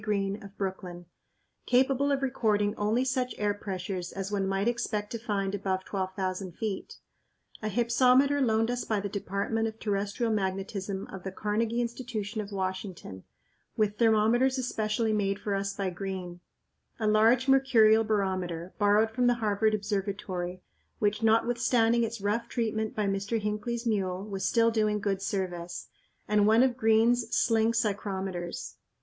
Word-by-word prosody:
Green, 200 Hz, 0 st, -1 dB
of 200 Hz, -1 st, -12 dB
Brooklyn, 185 Hz, -2 st, -5 dB, 0.6 s
capable 270 Hz, +2 st, +3 dB
of 275 Hz, -1 st, 0 dB
recording 210 Hz, -5 st, +1 dB
only 220 Hz, +5 st, +1 dB
such 255 Hz, -1 st, -1 dB
air 205 Hz, -1 st, +1 dB
pressures 185 Hz, -3 st, -5 dB
as 195 Hz, +1 st, -5 dB
one 195 Hz, -2 st, 0 dB
might 195 Hz, +2 st, 0 dB
expect 215 Hz, -3 st, -1 dB
to 230 Hz, -, -4 dB
find 200 Hz, -3 st, -2 dB
above 190 Hz, -2 st, -2 dB
12,000 185 Hz, -1 st, -3 dB
feet; 210 Hz, 0 st, -4 dB, 0.6 s
a 215 Hz, -, -2 dB
hypsometer 250 Hz, +5 st, +3 dB
loaned 225 Hz, -1 st, +2 dB
us 245 Hz, 0 st, -2 dB
by 215 Hz, -2 st, 0 dB
the 200 Hz, -, -3 dB
Department 200 Hz, +3 st, -2 dB
of 220 Hz, 0 st, -6 dB
Terrestrial 205 Hz, +2 st, -1 dB
Magnetism 195 Hz, 0 st, -2 dB
of 190 Hz, -, -7 dB
the 190 Hz, -, -5 dB
Carnegie 220 Hz, +4 st, -1 dB
Institution 230 Hz, -3 st, -4 dB
of 205 Hz, 0 st, -8 dB
Washington, 185 Hz, -, -5 dB, 0.5 s
with 210 Hz, -1 st, 0 dB
thermometers 230 Hz, +4 st, +3 dB
especially 220 Hz, -2 st, 0 dB
made 200 Hz, -2 st, 0 dB
for 205 Hz, 0 st, -3 dB
us 195 Hz, 0 st, -2 dB
by 195 Hz, -2 st, -2 dB
Green; 180 Hz, -1 st, -5 dB, 0.6 s
a 220 Hz, -, -1 dB
large 225 Hz, +5 st, +4 dB
mercurial 230 Hz, -5 st, +5 dB
barometer, 185 Hz, -5 st, -2 dB
borrowed 210 Hz, +2 st, +4 dB
from 245 Hz, +2 st, +1 dB
the 245 Hz, -, +4 dB
Harvard 215 Hz, -1 st, +1 dB
Observatory, 195 Hz, -3 st, -3 dB, 0.3 s
which, 210 Hz, +1 st, 0 dB
notwithstanding 235 Hz, +1 st, +3 dB
its 230 Hz, 0 st, -3 dB
rough 210 Hz, +3 st, -1 dB
treatment 220 Hz, -2 st, -2 dB
by 210 Hz, -, 0 dB
Mr. 200 Hz, +3 st, -1 dB
Hinckley's 215 Hz, +3 st, -3 dB
mule, 190 Hz, -4 st, -1 dB
was 195 Hz, -2 st, -5 dB
still 230 Hz, -1 st, +3 dB
doing 215 Hz, -2 st, +1 dB
good 200 Hz, -1 st, -1 dB
service; 180 Hz, -3 st, -4 dB, 0.4 s
and 210 Hz, 0 st, +3 dB
one 225 Hz, +3 st, +6 dB
of 255 Hz, -2 st, +2 dB
Green's 225 Hz, 0 st, +3 dB
sling 225 Hz, 0 st, +3 dB
psychrometers. 195 Hz, -5 st, -3 dB
210 Hz, 150 wpm, -29 LUFS, 195-230 Hz, 0.6 s, one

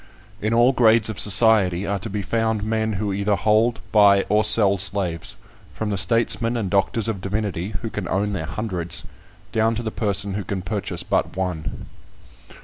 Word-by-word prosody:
In 110 Hz, -, -1 dB
all 120 Hz, +2 st, +4 dB
grades 115 Hz, -3 st, +4 dB
of 110 Hz, -, -5 dB
society 100 Hz, -3 st, +4 dB
are 100 Hz, 0 st, -2 dB
to 100 Hz, -, -6 dB
be 100 Hz, 0 st, -4 dB
found 110 Hz, 0 st, -1 dB
men 110 Hz, 0 st, -1 dB
who 100 Hz, 0 st, -2 dB
either 100 Hz, +1 st, 0 dB
hold, 110 Hz, +2 st, +1 dB
buy, 100 Hz, -2 st, +5 dB
or 105 Hz, +1 st, +3 dB
sell 100 Hz, -2 st, +3 dB
slaves, 95 Hz, -3 st, 0 dB, 0.4 s
from 110 Hz, -1 st, -3 dB
the -, -, -1 dB
statesmen 115 Hz, +3 st, +2 dB
and 100 Hz, -5 st, -3 dB
doctors 100 Hz, +3 st, 0 dB
of 105 Hz, -4 st, -3 dB
divinity, 100 Hz, -1 st, -3 dB
who 115 Hz, -, -3 dB
can 105 Hz, -4 st, -5 dB
own 100 Hz, +3 st, -1 dB
their 85 Hz, -5 st, -4 dB
hundreds, 90 Hz, -6 st, -3 dB, 0.5 s
down 115 Hz, 0 st, +1 dB
to 120 Hz, -, -4 dB
the 110 Hz, -, -3 dB
person 100 Hz, -2 st, -2 dB
who 100 Hz, +1 st, -3 dB
can 95 Hz, 0 st, -5 dB
purchase 90 Hz, -, -4 dB
but -, -, -1 dB
one. 90 Hz, -5 st, -4 dB
105 Hz, 180 wpm, -22 LUFS, 95-110 Hz, 0.5 s, buy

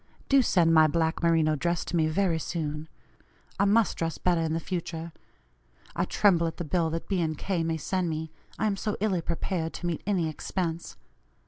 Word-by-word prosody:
Do 275 Hz, -1 st, +6 dB
send 170 Hz, -8 st, +3 dB
my 160 Hz, -1 st, +7 dB
black 160 Hz, +1 st, 0 dB
merino 165 Hz, -2 st, +3 dB
dress 170 Hz, +3 st, -1 dB
to -, -, -4 dB
me 160 Hz, -2 st, +3 dB
very 165 Hz, 0 st, +1 dB
soon; 155 Hz, -1 st, -4 dB, 0.7 s
I 200 Hz, -, +4 dB
must 215 Hz, +2 st, +3 dB
dress 165 Hz, -1 st, -2 dB
better 175 Hz, -2 st, +1 dB
in 160 Hz, -1 st, -1 dB
the 165 Hz, -, 0 dB
future. 170 Hz, -1 st, -4 dB, 0.8 s
I -, -, +1 dB
tremble 175 Hz, -5 st, +3 dB
at 165 Hz, -, -5 dB
the -, -, -3 dB
bill 165 Hz, +1 st, 0 dB
that 165 Hz, +1 st, -4 dB
B. 185 Hz, -4 st, 0 dB
& -, -, -17 dB
K. 185 Hz, 0 st, -1 dB
may 165 Hz, 0 st, -1 dB
send 180 Hz, +3 st, -1 dB
me, 160 Hz, 0 st, -4 dB, 0.3 s
I 220 Hz, -, 0 dB
am 205 Hz, -2 st, +1 dB
so 210 Hz, +1 st, -2 dB
illy 195 Hz, -5 st, +1 dB
prepared 165 Hz, 0 st, -2 dB
to -, -, -6 dB
meet 170 Hz, -2 st, -2 dB
any 185 Hz, -6 st, +1 dB
expense. 165 Hz, +1 st, -4 dB
170 Hz, 200 wpm, -28 LUFS, 160-185 Hz, 0.8 s, my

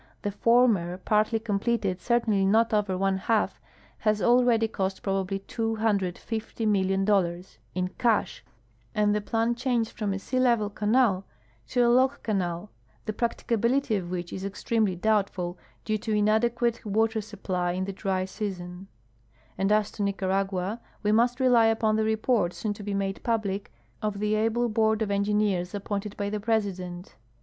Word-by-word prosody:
The 205 Hz, -, -1 dB
former, 210 Hz, -5 st, +3 dB
parti}" 215 Hz, +3 st, +1 dB
comjffeted 205 Hz, -3 st, -1 dB
— -, -, -26 dB
cer 240 Hz, 0 st, +2 dB
tainly 205 Hz, -4 st, +1 dB
not 225 Hz, +3 st, +3 dB
over 205 Hz, -3 st, +1 dB
one 195 Hz, 0 st, +1 dB
half 220 Hz, +2 st, 0 dB, 0.2 s
— -, -, -27 dB
has 215 Hz, -1 st, +1 dB
already 240 Hz, -1 st, +4 dB
cost 190 Hz, -3 st, -3 dB
probably 195 Hz, 0 st, -1 dB
$250,000,000 200 Hz, -3 st, 0 dB, 0.2 s
in 185 Hz, 0 st, 0 dB
cash 225 Hz, +3 st, 0 dB, 0.5 s
and 210 Hz, -1 st, +3 dB
the 210 Hz, -, 0 dB
plan 225 Hz, +3 st, 0 dB
changed 240 Hz, -2 st, -1 dB
from 210 Hz, -3 st, -3 dB
a 195 Hz, -, -1 dB
sea 255 Hz, +6 st, -2 dB
level 235 Hz, -5 st, +2 dB
canal 210 Hz, -2 st, +2 dB, 0.4 s
to 245 Hz, -, +2 dB
a -, -, +4 dB
lock 260 Hz, +3 st, +3 dB
canal, 185 Hz, -2 st, -2 dB, 0.3 s
the 215 Hz, -, -2 dB
practicability 235 Hz, +2 st, 0 dB
of 185 Hz, -3 st, -3 dB
wliich 175 Hz, -1 st, -4 dB
is 190 Hz, -, -5 dB
extremely 200 Hz, 0 st, 0 dB
doubtful, 190 Hz, -3 st, 0 dB, 0.3 s
due 215 Hz, -1 st, 0 dB
to 220 Hz, +1 st, -3 dB
inadequate 225 Hz, +3 st, +1 dB
water 220 Hz, +1 st, +1 dB
supply 185 Hz, -4 st, -3 dB
in 185 Hz, +1 st, -2 dB
the 195 Hz, -, -5 dB
dry 190 Hz, -1 st, -1 dB
season; 185 Hz, -2 st, -6 dB, 0.7 s
and 195 Hz, +2 st, 0 dB
as 210 Hz, -1 st, +2 dB
to -, -, -7 dB
Nicaragua, 195 Hz, +1 st, -1 dB, 0.2 s
we 210 Hz, -, +2 dB
mu.st 240 Hz, +3 st, +3 dB
rely 245 Hz, -3 st, +5 dB
u))on 220 Hz, -1 st, +1 dB
the 220 Hz, -, +1 dB
report, 220 Hz, -4 st, +1 dB
soon 210 Hz, -2 st, -2 dB
to 205 Hz, -, -11 dB
be 205 Hz, 0 st, -3 dB
made 195 Hz, -1 st, -2 dB
public, 205 Hz, -4 st, -2 dB, 0.3 s
of 210 Hz, -2 st, -2 dB
the 210 Hz, +1 st, 0 dB
able 225 Hz, +3 st, +1 dB
board 220 Hz, -1 st, +2 dB
of 205 Hz, -, -3 dB
engineers 200 Hz, -2 st, 0 dB
appointed 205 Hz, 0 st, -4 dB
by 200 Hz, 0 st, -2 dB
the 210 Hz, -, -2 dB
Presidcmt. 195 Hz, -5 st, -2 dB
210 Hz, 160 wpm, -27 LUFS, 195-225 Hz, 0.7 s, rely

